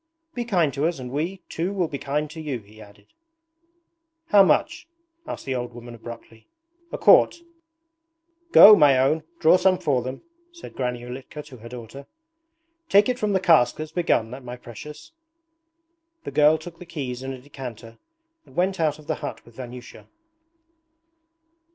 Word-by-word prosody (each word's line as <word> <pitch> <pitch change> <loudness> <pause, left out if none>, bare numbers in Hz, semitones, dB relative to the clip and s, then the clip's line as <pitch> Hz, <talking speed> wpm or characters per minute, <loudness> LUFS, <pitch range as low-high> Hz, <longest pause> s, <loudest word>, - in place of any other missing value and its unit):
'Be 240 -1 -4
kind 175 - +1
to 145 +2 0
us 170 - -3
and 125 -2 -8
we, 170 +7 -3
too 170 +4 -3
will 185 -4 0
be 140 -2 -6
kind 145 +3 -2
to 160 0 -8
you,' 145 -5 -3
he 105 +1 -17
added. 100 - -18 1.2
'How 205 - +7
much?' 195 - +1 0.4
asked - - -6
the 135 - -2
old 120 -1 -4
woman 120 0 -10
abruptly. 115 -1 -12 0.4
'A - - -4
quart.' - - +5 1.1
'Go, 215 -8 +10
my 145 -7 +5
own, 135 +5 +2 0.2
draw 165 +3 +5
some 185 0 +3
for 145 -8 0
them,' 130 +2 -7 0.3
said 345 -1 -12
Granny 125 -2 -3
Ulitka 130 +4 -8
to 135 -4 -13
her 115 +1 -11
daughter. 125 +3 -10 0.8
'Take 200 +4 +5
it 250 0 -1
from 210 -4 0
the 190 - +3
cask 160 -9 +4
that's 155 0 -7
begun, 120 -10 0
my 125 0 -8
precious.' 150 - -11 1.1
The - - -6
girl 150 +1 +4
took 170 +1 -11
the 180 - -10
keys 135 -7 -5
and 135 0 -5
a - - -12
decanter 125 -4 -10 0.5
and - - -19
went 190 +1 0
out 155 -3 +1
of 155 - -16
the 155 - -2
hut - - -6
with 120 - -18
Vanyusha. 125 -1 -10
145 Hz, 170 wpm, -24 LUFS, 125-170 Hz, 1.2 s, Go